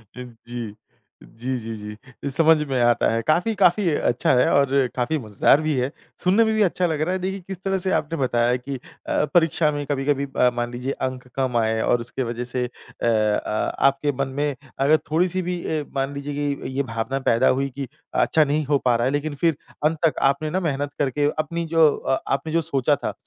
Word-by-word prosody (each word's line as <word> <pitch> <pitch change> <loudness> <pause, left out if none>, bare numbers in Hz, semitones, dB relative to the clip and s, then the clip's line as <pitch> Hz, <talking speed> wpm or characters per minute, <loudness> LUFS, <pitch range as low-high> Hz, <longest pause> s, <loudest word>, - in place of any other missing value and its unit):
जी। 120 -3 -8 0.6
जी, 125 +3 -3
जी, 115 -1 -6 0.5
जी। 140 - -2
समझ 160 +2 +5
में 130 -2 0
आता 120 0 +3
है। 115 0 0
काफ़ी, 180 +8 +2
काफ़ी 185 0 +3
अच्छा 125 -5 +1
है 125 - +4
और 140 -1 +3
अ, 135 -2 +3
काफ़ी 125 +5 0
मजेदार 110 +5 +3
भी 155 -1 0
है। 125 +2 0 0.3
सुनने 195 +5 +4
में 220 - +1
भी 215 - +2
अच्छा 185 -1 +2
लग 155 -2 -2
रहा 180 +4 0
है। 185 - -1
देखिए 190 +2 -3
किस 190 -2 -5
तरह 195 0 0
से 185 - +1
आपने 160 +2 -5
बताया 120 -2 +2
कि 135 +2 -6 0.3
अ, - - +2
परीक्षा 165 -2 +3
में 145 -1 -3
कभी-कभी 140 0 0
अ, 125 - +5
मान 120 0 -2
लीजिए 125 +2 -3 0.2
अंक 125 -1 -8
कम 130 -3 0
आए 110 0 +1
और 120 -1 +2
उसकी 120 +3 -4
वजह 120 +1 -4
से 125 0 -2
अ, 120 -1 -7
आ 110 -1 +1 0.3
आपके 140 +2 +1
मन 140 - +1
में 145 -2 0 0.2
अगर 145 +3 +5
थोड़ी 175 +4 +3
सी 185 +2 -1
भी 180 0 -2
ए, 155 -2 -1
मान 135 +1 -1
लीजिए 140 +1 -5
कि 145 -1 -2
ये - - -3
ये 140 - +2
भावना 115 +3 -3
पैदा 115 - +3
हुई 135 +1 +1
कि 140 -2 -4 0.3
अच्छा 155 - +3
नहीं 150 +1 0
हो 145 0 +2
पा 120 -1 +4
रहा 120 +1 +1
है। 130 - +1
लेकिन 145 0 -2
फिर 165 +1 +1 0.3
अंत 160 +1 +2
तक 155 - +1
आपने 155 +2 -4
ना 185 +4 0
मेहनत 145 -4 -2
करके 145 +1 +1
अपनी 170 +2 -2
जो 160 -1 +7 0.2
आपने 135 +3 -1
जो 165 - +3
सोचा 145 -2 +1
था, - - -4
140 Hz, 220 wpm, -23 LUFS, 125-155 Hz, 0.6 s, जो